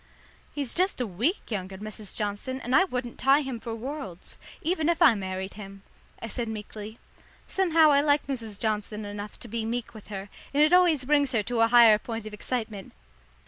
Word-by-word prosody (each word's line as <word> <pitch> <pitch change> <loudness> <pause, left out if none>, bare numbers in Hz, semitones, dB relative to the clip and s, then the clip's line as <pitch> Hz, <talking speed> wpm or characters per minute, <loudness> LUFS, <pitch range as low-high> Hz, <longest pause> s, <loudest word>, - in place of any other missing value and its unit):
"He's 280 -4 -3
just 370 -2 +1
a 250 - 0
week 235 - -2
younger, 190 -2 -4
Mrs. 215 0 -8
Johnson, 210 +5 -3
and 250 +2 0
I 380 - +6
wouldn't 250 -8 -5
tie 275 +3 +5
him 265 -4 -4
for 230 0 -5
worlds, 235 - -7 0.2
even 330 -1 +1
if 340 - +1
I 250 - +7
married 190 -1 -4
him," 195 -1 -10 0.4
I - - -5
said 235 +1 -4
meekly. 215 0 -7 0.5
Somehow 330 -5 +4
I 280 0 +5
like 290 0 +2
Mrs. 225 -7 -5
Johnson 215 -1 -2
enough 205 0 -7
to - - -8
be 230 0 -3
meek 235 +1 -3
with 215 -2 -12
her, 200 -1 -6 0.3
and 295 - +6
it 310 +3 +4
always 345 -7 +5
brings 285 -1 +2
her 220 -3 +2
to 235 +2 -2
a 225 - +6
higher 230 -3 +7
point 225 -1 -6
of 215 - -8
excitement. 220 -2 -4
230 Hz, 195 wpm, -27 LUFS, 210-280 Hz, 0.5 s, I